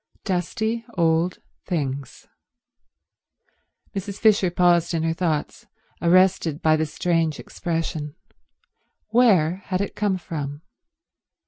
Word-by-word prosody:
Dusty 220 +5 -1
old 165 +1 +2 0.3
things. 140 -6 -3 1.7
Mrs. 200 +1 -4
Fisher 210 -4 +4
paused 175 -1 +3
in 160 - 0
her 165 0 +1
thoughts, 165 -4 -2 0.3
arrested 175 -3 +3
by 155 -2 +3
the 155 0 0
strange 165 -1 0
expression. 160 -3 -4 0.9
Where 195 -8 +4
had 185 -1 -1
it 200 - -3
come 205 -3 0
from? 150 -4 -6
170 Hz, 100 wpm, -23 LUFS, 160-185 Hz, 1.7 s, Fisher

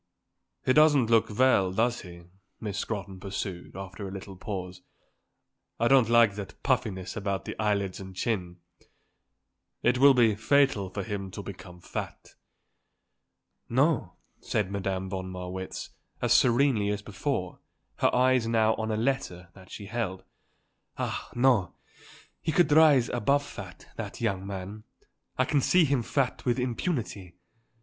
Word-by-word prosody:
"He 130 - +4
doesn't 145 -6 +5
look 115 0 +4
well, 125 -8 +4
does 115 +5 0
he?" 85 -2 -11 0.4
Miss 105 -2 -4
Scrotton 100 -4 -4
pursued, 95 -3 -5
after 95 +1 -7
a - - -7
little 95 0 -8
pause. 90 -1 -6 1.0
"I 120 - +3
don't 130 -4 +5
like 115 -3 +5
that 100 -1 -9
puffiness 115 -9 -1
about 100 -3 -2
the - - -5
eyelids 100 -3 0
and 95 -1 -9
chin. 90 -4 -2 1.3
It 125 +1 +3
will 140 0 +7
be 115 -3 +5
fatal 110 -3 +2
for 100 +1 -4
him 100 -2 -4
to 100 +2 -7
become 90 -2 -10
fat." - - -7 1.4
"No," - - +1 0.2
said 100 -2 -1
Madame 95 -1 -2
von 95 -1 -4
Marwitz, 90 +1 -6 0.3
as 120 -1 +2
serenely 120 -3 +3
as 105 0 -2
before, 100 -2 -3 0.4
her - - +3
eyes 130 -2 +3
now 110 -1 +3
on 110 0 -2
a 110 - 0
letter 110 -8 -2
that 95 -2 -16
she 100 - -8
held. 100 -4 -3 0.7
"Ah, - - -3
no; 120 -6 +3 0.7
he 160 - -1
could 160 -1 +3
rise 145 -5 +6
above 140 +5 +1
fat, 95 -9 -10
that - - -6
young 100 -4 -1
man. 100 +2 -6 0.5
I 130 - +3
can 145 +1 +2
see 180 +5 +4
him 140 -3 +1
fat 130 +2 -1
with 120 -1 +1
impunity. 120 - -3
105 Hz, 145 wpm, -28 LUFS, 95-125 Hz, 1.4 s, will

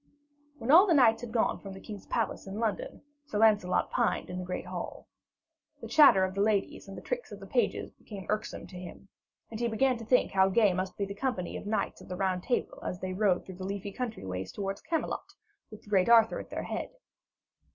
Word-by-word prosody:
When 235 +1 -1
all 360 +6 +9
the 340 - +4
knights 235 -5 +5
had 240 -2 -7
gone 230 -1 +1
from 195 -1 -8
the 190 - -9
king's 205 -1 -9
palace 225 -4 -2
in 195 +2 -6
London, 220 -3 -3 0.2
Sir 210 - -3
Lancelot 210 -4 +3
pined - - 0
in 180 - -4
the - - -4
great 180 0 -4
hall. - - -6 0.7
The - - -7
chatter 260 -11 +7
of 185 0 -1
the 200 - -1
ladies 205 -1 0
and 195 - -9
the - - -9
tricks - - -4
of - - -8
the - - -9
pages 485 - 0
became 195 -3 -10
irksome 215 0 -3
to 180 - -10
him, 185 +2 -10 0.4
and 220 - -5
he 235 - +1
began 245 +2 +1
to - - -7
think 250 +3 +3
how 190 0 +4
gay 205 -1 +4
must 185 +1 -3
be 200 - -1
the 200 - -6
company 210 -4 -3
of - - -6
the - - -4
knights 220 - -1
of - - -13
the 180 - -5
Round 185 -1 0
Table, 245 - -2
as 180 - -4
they 185 0 -4
rode 190 -2 +1
through 185 -2 -9
the 185 - -7
leafy 200 +1 -4
country 230 - -5
ways 90 0 -4
towards 195 -1 -4
Camelot, 330 -1 -3 0.3
with 215 - -12
the - - -16
great 190 +1 +3
Arthur 225 -1 +6
at - - -9
their - - -4
head. - - -4
205 Hz, 235 wpm, -30 LUFS, 190-230 Hz, 0.7 s, all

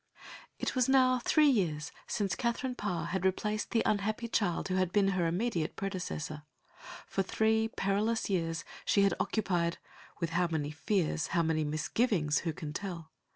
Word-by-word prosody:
It - - -2
was 255 -1 +2
now 255 -1 +5
three 305 +5 +4
years 165 - 0 0.2
since 200 -4 -1
Katherine 250 +1 -1
Parr 185 -8 -2
had 185 +2 -2
replaced 210 +3 0
the 230 - +2
unhappy 215 +3 0
child 200 -6 0
who 185 - -2
had 185 -1 +1
been 200 -1 +3
her 180 -3 +1
immediate 175 -2 -1
predecessor. 180 -6 -4 0.6
For 195 - -1
three 220 +3 +2
perilous 215 +2 0
years 165 -4 -1 0.2
she 200 - +3
had 195 -2 +4
occupied 175 -5 0 0.4
with 165 -1 -1
how 175 +1 +2
many 155 -3 -2
fears, 160 -3 0
how 170 - +4
many 160 -1 +1
misgivings, 155 +2 +1
who 165 - -2
can 150 -1 -6
tell? 170 -3 -5
190 Hz, 160 wpm, -31 LUFS, 165-220 Hz, 0.6 s, now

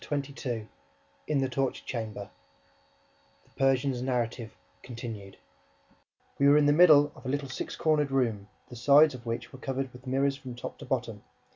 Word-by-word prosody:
Chapter 140 -1 -3
XXII 115 -7 -4 0.6
In 150 - +1
the 135 - +1
Torture 130 +1 -2
Chamber 110 -4 -5 1.1
THE - - -29
PERSIAN'S 135 -1 +1
NARRATIVE 120 -3 -2 0.3
CONTINUED 115 -6 -8 1.0
We 140 - +5
were 145 - +6
in 150 - +4
the 145 - +5
middle 150 -3 +6
of - - -16
a 130 - -4
little 140 0 -2
six 125 - -5
cornered 150 -3 +1
room, 115 -7 0 0.2
the 125 - -10
sides 145 +5 +5
of 120 -2 -10
which 115 +2 -4
were 130 - -10
covered 135 0 -3
with 125 +1 -14
mirrors 135 +2 +1
from 130 -3 -9
top 120 - -8
to - - -9
bottom. - - -3
130 Hz, 170 wpm, -28 LUFS, 120-140 Hz, 1.1 s, were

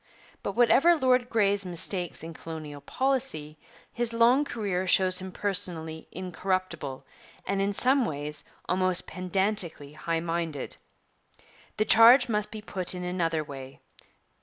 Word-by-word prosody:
But 200 - -4
whatever 260 - +5
Lord 255 -4 +2
Grey's 200 -3 +2
mistakes 180 -1 -3
in 165 0 -7
colonial 155 -3 -8
policy, 255 - -2 0.3
his 240 -1 -2
long 235 +5 +4
career 195 -7 -3
shows 185 0 +4
him 190 0 -7
personally 170 -5 -3
incorruptible, 180 -5 -4 0.4
and 195 0 -1
in 200 +1 0
some 260 +6 +3
ways 145 -2 -5 0.2
almost 185 -1 +2
pedantically 185 -5 0
high 165 +2 -2
minded. 165 -3 -4 1.0
The 215 - +1
charge 230 +5 +7
must 210 -2 -1
be 215 -1 -9
put 185 -3 -1
in 180 - -5
another 165 -3 -1
way. 135 -2 -10
185 Hz, 130 wpm, -27 LUFS, 165-215 Hz, 1.0 s, charge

